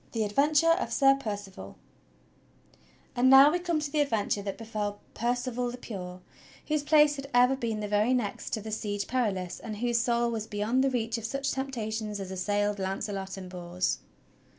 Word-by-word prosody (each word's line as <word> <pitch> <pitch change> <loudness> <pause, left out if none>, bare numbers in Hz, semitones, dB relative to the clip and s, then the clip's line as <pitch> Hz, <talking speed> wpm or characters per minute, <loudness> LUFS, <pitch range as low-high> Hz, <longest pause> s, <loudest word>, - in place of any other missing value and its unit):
THE 225 -2 0
ADVENTURE 295 +9 +3
OF - - -3
SIR 270 -1 +5
PERCIVAL 205 -5 -7 1.4
And 255 +1 +4
now 270 +2 +9
we 355 - 0
come 345 -3 0
to 295 -1 -4
the 305 - 0
adventure 220 -7 0
that 200 -1 -5
befell 210 -2 -4
Percival 245 +1 -1
the 245 - -7
Pure 185 -6 -7 0.5
whose 305 -1 +1
place 295 0 +4
had 275 0 -7
ever 250 +2 +5
been 225 -4 -3
the 210 - -3
very 210 +5 +2
next 220 -5 -3
to 220 - -1
the 220 +1 -7
Siege 205 -2 -2
Perilous, 200 -8 -1
and 215 -2 -6
whose 240 +1 +1
soul 235 0 +1
was 220 -1 -3
beyond 215 +5 0
the 270 - +3
reach 230 -2 -1
of 225 - -7
such 275 +4 -2
temptations 220 -6 -3
as 190 -1 -6
assailed 205 +2 -1
Launcelot 195 0 -3
and 185 -1 -7
Bors. 180 0 -2
225 Hz, 180 wpm, -28 LUFS, 205-265 Hz, 1.4 s, now